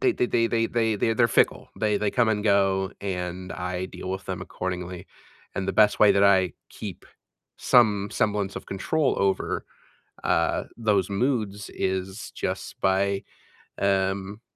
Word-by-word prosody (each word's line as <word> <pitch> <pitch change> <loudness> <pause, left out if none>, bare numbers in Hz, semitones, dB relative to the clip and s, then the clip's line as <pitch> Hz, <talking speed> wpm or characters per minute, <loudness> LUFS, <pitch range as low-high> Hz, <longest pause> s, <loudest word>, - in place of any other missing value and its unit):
They 380 -2 +3
they 125 - 0
they 115 -1 +2
they 115 0 +1
they 115 -2 +1
they 115 +3 +1
they're 115 0 +3
fickle. - - +2
They 105 -2 +1
they 105 0 0
come 120 0 +2
and 105 -1 +1
go, 95 -2 +2
and 90 -1 -4
I 90 0 -3
deal 95 - -7
with 95 0 -4
them - - -4
accordingly. 90 0 -5 0.5
And 95 0 -2
the - - +1
best 105 +2 +4
way 105 - +7
that 100 - +4
I 95 -4 +4 0.2
keep - - -8 0.5
some 105 -5 +4
semblance 105 -2 0
of - - -7
control 140 +9 0
over, 95 -1 0 0.6
uh, - - +1
those 105 -5 +1
moods 105 -2 -1
is 95 +2 -3
just - - -4
by, 100 +1 +1 0.5
um, 100 +1 0
100 Hz, 155 wpm, -25 LUFS, 95-110 Hz, 0.6 s, way